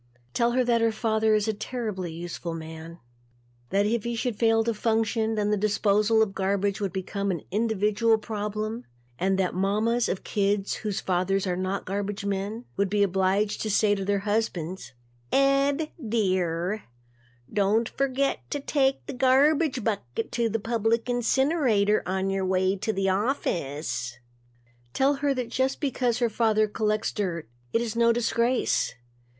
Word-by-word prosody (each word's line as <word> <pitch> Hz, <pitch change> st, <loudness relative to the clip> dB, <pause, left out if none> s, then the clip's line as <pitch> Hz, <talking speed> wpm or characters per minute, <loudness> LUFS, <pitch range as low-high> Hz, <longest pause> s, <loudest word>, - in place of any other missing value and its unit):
Tell 235 Hz, 0 st, +2 dB
her 255 Hz, +1 st, +3 dB
that 235 Hz, -1 st, +2 dB
her 230 Hz, 0 st, +3 dB
father 220 Hz, -1 st, +1 dB
is 210 Hz, 0 st, +1 dB
a 220 Hz, -, +1 dB
terribly 210 Hz, -5 st, -4 dB
useful 170 Hz, 0 st, -5 dB
man. 160 Hz, +1 st, -8 dB, 0.7 s
That 200 Hz, +5 st, +2 dB
if 225 Hz, 0 st, 0 dB
he 235 Hz, 0 st, -2 dB
should 235 Hz, 0 st, -2 dB
fail 225 Hz, 0 st, +3 dB
to 230 Hz, 0 st, 0 dB
function, 220 Hz, 0 st, 0 dB
then 210 Hz, -1 st, 0 dB
the 210 Hz, -, +2 dB
disposal 210 Hz, +2 st, +3 dB
of 200 Hz, -3 st, -3 dB
garbage 200 Hz, +1 st, 0 dB
would 195 Hz, -2 st, -1 dB
become 200 Hz, +2 st, -3 dB
an 175 Hz, -5 st, -2 dB
individual 220 Hz, +1 st, +2 dB
problem 215 Hz, +1 st, -4 dB, 0.3 s
and 190 Hz, +1 st, +1 dB
that 185 Hz, -2 st, +1 dB
the -, -, -7 dB
mamas 220 Hz, +5 st, +1 dB
of 185 Hz, -, -3 dB
kids 200 Hz, -1 st, 0 dB
whose 210 Hz, -3 st, -3 dB
fathers 185 Hz, +2 st, 0 dB
are 180 Hz, -1 st, 0 dB
not 185 Hz, +2 st, -2 dB
garbage 200 Hz, +1 st, -3 dB
men 200 Hz, +4 st, -3 dB
would 200 Hz, 0 st, +1 dB
be 205 Hz, +1 st, +2 dB
obliged 195 Hz, +2 st, +1 dB
to 215 Hz, -, -2 dB
say 205 Hz, 0 st, +3 dB
to 195 Hz, -1 st, -2 dB
their 200 Hz, 0 st, 0 dB
husbands 190 Hz, -7 st, -2 dB, 0.4 s
"Ed, 275 Hz, +2 st, +2 dB
dear, 185 Hz, -3 st, 0 dB, 0.7 s
don't 210 Hz, +3 st, +2 dB
forget 275 Hz, 0 st, 0 dB
to 290 Hz, -, -2 dB
take 270 Hz, -1 st, +1 dB
the -, -, -6 dB
garbage 270 Hz, +1 st, +3 dB
bucket 200 Hz, -, -3 dB
to 235 Hz, -1 st, 0 dB
the 225 Hz, -, 0 dB
public 230 Hz, +2 st, 0 dB
incinerator 245 Hz, -4 st, +2 dB
on 190 Hz, +1 st, -1 dB
your 195 Hz, 0 st, -1 dB
way 185 Hz, +1 st, +1 dB
to 200 Hz, +3 st, -2 dB
the 195 Hz, -2 st, 0 dB
office." 150 Hz, -, -2 dB, 0.8 s
Tell 270 Hz, +2 st, +3 dB
her 285 Hz, -1 st, +2 dB
that 250 Hz, -2 st, -3 dB
just 260 Hz, +2 st, 0 dB
because 250 Hz, -4 st, 0 dB
her 245 Hz, -1 st, +2 dB
father 215 Hz, -1 st, +2 dB
collects 215 Hz, 0 st, -1 dB
dirt, 175 Hz, -, -3 dB, 0.2 s
it 230 Hz, -, +1 dB
is 230 Hz, -1 st, -4 dB
no 235 Hz, 0 st, +4 dB
disgrace. 235 Hz, -, +1 dB
215 Hz, 160 wpm, -26 LUFS, 195-235 Hz, 0.8 s, no